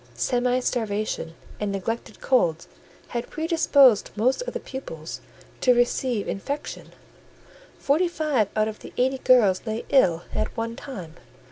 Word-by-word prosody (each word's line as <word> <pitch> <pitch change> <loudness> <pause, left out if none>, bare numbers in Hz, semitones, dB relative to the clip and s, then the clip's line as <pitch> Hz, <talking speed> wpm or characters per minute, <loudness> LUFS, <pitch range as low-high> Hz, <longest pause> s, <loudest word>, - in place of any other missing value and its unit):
Semi 250 0 +1
starvation 215 -9 -2 0.2
and 210 -1 -1
neglected 200 +4 -4
colds 170 -11 +2 0.4
had 240 0 -4
predisposed 305 - +4
most 250 - +1
of - - -5
the - - -1
pupils 165 - -7 0.4
to 250 -1 +4
receive 240 -2 +1
infection: 285 +9 -5 0.9
forty 310 +6 +2
five 305 - 0
out 215 0 +2
of 215 -1 -6
the - - -11
eighty 260 +1 +1
girls 225 -8 +4
lay 220 +1 -3
ill 175 -11 +4
at - - -2
one 230 0 -2
time. 185 - -8
240 Hz, 135 wpm, -25 LUFS, 205-265 Hz, 0.9 s, predisposed